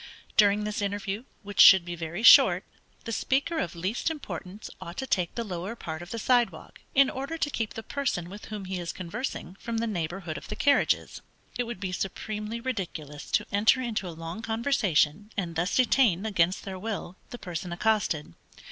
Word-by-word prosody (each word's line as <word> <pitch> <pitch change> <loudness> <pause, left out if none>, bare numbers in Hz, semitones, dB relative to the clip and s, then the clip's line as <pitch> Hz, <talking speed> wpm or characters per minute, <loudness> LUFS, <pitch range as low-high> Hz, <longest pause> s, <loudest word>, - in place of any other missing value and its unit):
During 205 0 +5
this 210 0 -3
interview, 205 +2 -3 0.2
which 205 0 +2
should 190 -3 +9
be 175 - -5
very 170 +5 -5
short, - - +8 0.4
the 230 - -5
speaker 275 +8 0
of 170 - -3
least 190 - -1
importance 205 - -7
ought 170 +1 -8
to 265 - -2
take 180 -9 0
the 235 - -2
lower 190 +1 -5
part 160 -7 -6
of 175 - -9
the 230 - -4
side 245 +1 +3
walk, - - -14
in 275 0 +7
order 275 +6 -4
to 295 - 0
keep 225 -5 -3
the 225 - -6
person 245 -13 -2
with 200 +4 -9
whom 210 -3 -6
he 185 -1 -3
is 170 -1 -4
conversing, 185 +1 -5
from 230 -1 -3
the 230 - 0
neighborhood 170 -5 -3
of - - -13
the - - -5
carriages. 285 -1 +2 0.3
It 245 - -1
would 235 -5 -6
be 185 -1 -3
supremely 210 +4 -4
ridiculous 175 - -5
to - - +3
enter 210 +6 +4
into 230 -6 -2
a - - -4
long 165 +5 -7
conversation, 210 - +1
and 175 -4 -2
thus 175 +3 0
detain, 235 -7 +3
against 185 -4 +1
their 190 -1 -6
will, 205 -3 -4
the 245 - -7
person 175 -3 -5
accosted. 175 - 0
205 Hz, 190 wpm, -28 LUFS, 175-230 Hz, 0.4 s, should